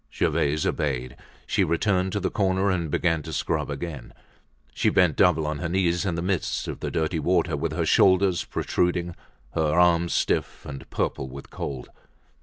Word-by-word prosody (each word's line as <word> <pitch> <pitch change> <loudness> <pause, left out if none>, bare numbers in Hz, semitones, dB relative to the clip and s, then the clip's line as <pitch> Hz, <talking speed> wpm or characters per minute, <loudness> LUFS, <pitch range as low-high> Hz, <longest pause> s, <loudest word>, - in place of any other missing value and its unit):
Gervaise 75 +1 0
obeyed. 65 -4 -2 0.3
She - - +1
returned 95 +3 +1
to 105 - 0
the 95 - -2
corner 95 0 +1
and 85 -4 -1
began 85 +1 +1
to 80 - -8
scrub 75 - -1
again. 70 -2 -6 0.6
She - - +2
bent 90 -5 +3
double 90 -5 +3
on 75 -1 -2
her 85 - -3
knees 90 +1 +1
in 85 - -1
the 85 - -3
midst 95 -2 -1
of - - -5
the - - -3
dirty 80 +1 -1
water, 85 0 +1
with 70 - -2
her - - -1
shoulders 95 -2 +4
protruding, 85 -1 -1 0.4
her 80 0 +1
arms 85 -1 +4
stiff - - -1
and 70 0 -8
purple 65 -2 -2
with 70 +1 -10
cold. 65 -3 -5
85 Hz, 175 wpm, -25 LUFS, 75-90 Hz, 0.6 s, shoulders